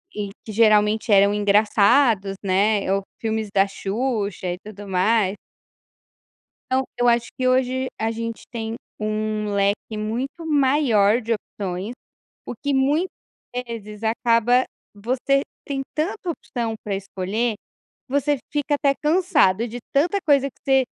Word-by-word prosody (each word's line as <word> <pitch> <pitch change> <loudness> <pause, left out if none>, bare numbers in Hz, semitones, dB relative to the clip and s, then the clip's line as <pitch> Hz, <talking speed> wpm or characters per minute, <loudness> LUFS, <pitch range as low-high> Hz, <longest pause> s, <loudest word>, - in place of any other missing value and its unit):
e 205 -1 -3 0.2
que 220 - -6
geralmente 215 0 +3
eram 200 0 +6
engraçados, 205 +1 +3
né, 200 +1 +2
ou 195 - +1 0.2
filmes 220 -1 -2
da 195 0 +4
Xuxa, 200 -1 -2
e - - -6
tudo 205 0 -10
mais. 195 +1 +2 1.4
Então, 260 +1 +2
eu 245 0 +2
acho 235 0 +2
que 255 0 +1
hoje 260 0 +1
a 225 +1 0
gente 230 0 -5
tem 225 -1 -4 0.2
um 215 0 -2
leque 200 +2 0
muito 255 +10 -4
maior 260 -7 +3
de 230 0 -2
opções, 195 -1 -4 0.5
o - - -5
que 285 -1 0
muitas 290 +7 +2 0.6
vezes 215 -3 -8
acaba 230 +2 +3 0.3
você 255 +6 0 0.2
tem 275 -1 -2
tanta 350 +4 -2
opção 235 -8 -3
pra 205 - -3
escolher, 195 +4 -2
que 210 - -34
você 285 +1 +2
fica 290 0 0
até 280 -1 +2
cansado 300 - +3
de 240 0 -6 0.2
tanta 335 +8 +2
coisa 280 -2 +4
que - - -31
você 270 -1 +3
225 Hz, 135 wpm, -22 LUFS, 205-265 Hz, 1.4 s, eram